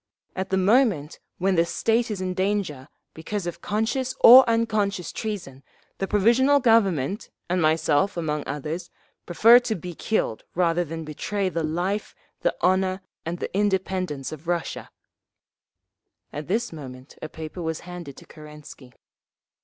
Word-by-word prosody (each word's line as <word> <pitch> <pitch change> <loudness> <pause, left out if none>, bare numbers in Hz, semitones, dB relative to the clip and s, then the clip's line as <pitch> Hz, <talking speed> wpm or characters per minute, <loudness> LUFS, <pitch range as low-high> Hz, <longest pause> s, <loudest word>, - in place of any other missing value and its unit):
"At 190 0 -3
the 190 - +1
moment 190 - +2 0.2
when 190 +2 +1
the 165 -2 +4
state 230 +7 0
is 205 -3 -4
in 185 0 -2
danger, 185 -8 -2 0.3
because 185 +4 -5
of 175 - -6
conscious 235 +5 -1
or 255 +3 +11
unconscious 215 -5 0
treason, 175 - -5 0.4
the 195 - -1
Provisional 240 +8 +4
Government, 200 - +2 0.2
and 180 +1 0
myself 160 +4 +2
among 150 -3 -1
others, 155 +5 -5 0.4
prefer 230 +7 +7
to 240 -3 -3
be 180 0 -7
killed 165 - -2
rather 175 0 +2
than 165 0 -6
betray 190 +6 -2
the 170 -2 -2
life, 175 +6 -2 0.2
the - - 0
honour 185 +1 +1 0.2
and 170 +1 -3
the - - -6
independence 185 -7 -1
of 155 +1 -10
Russia…." 175 -1 -3 1.4
At 150 0 -6
this 220 +2 -1
moment 130 -3 -10
a 155 - -6
paper 160 +3 -8
was 160 -1 -3
handed 175 -6 -9
to - - -13
Kerensky. 150 -4 -13
180 Hz, 145 wpm, -24 LUFS, 160-210 Hz, 1.4 s, or